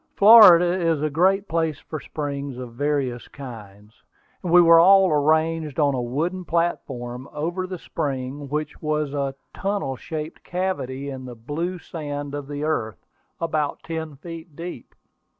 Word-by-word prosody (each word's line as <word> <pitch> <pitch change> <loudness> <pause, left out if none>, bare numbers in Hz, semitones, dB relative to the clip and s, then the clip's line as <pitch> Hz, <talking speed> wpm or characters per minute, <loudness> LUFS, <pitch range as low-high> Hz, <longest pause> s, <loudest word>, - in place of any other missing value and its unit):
Florida 185 -5 +8
is 165 -3 +1
a 155 - 0
great 190 +6 +2
place 160 -2 0
for 155 - -7
springs 140 -3 -5
of 125 -2 -8
various 135 -2 -1
kinds. 105 -5 -11 0.4
We 180 -1 +5
were 165 -1 +7
all 190 +1 +6
arranged 155 +1 +1
on 145 -2 +3
a 130 - -1
wooden 160 +10 -2
platform 135 -7 -2
over 175 +5 -3
the 185 0 -5
spring, 140 -2 -4
which 150 +1 -4
was 150 -2 -1
a 140 -2 -2 0.2
tunnel 195 -9 -2
shaped 155 +3 -7
cavity 140 -7 -3
in 130 -1 -7
the 125 -1 -8
blue 155 +10 -4
sand 145 -4 -6
of 145 -1 -5
the 145 0 -5
earth, 110 -10 -2 0.3
about 155 -3 -2
ten 160 -2 -5
feet 165 +1 -10
deep. 170 -6 -8
150 Hz, 150 wpm, -23 LUFS, 135-170 Hz, 0.4 s, Florida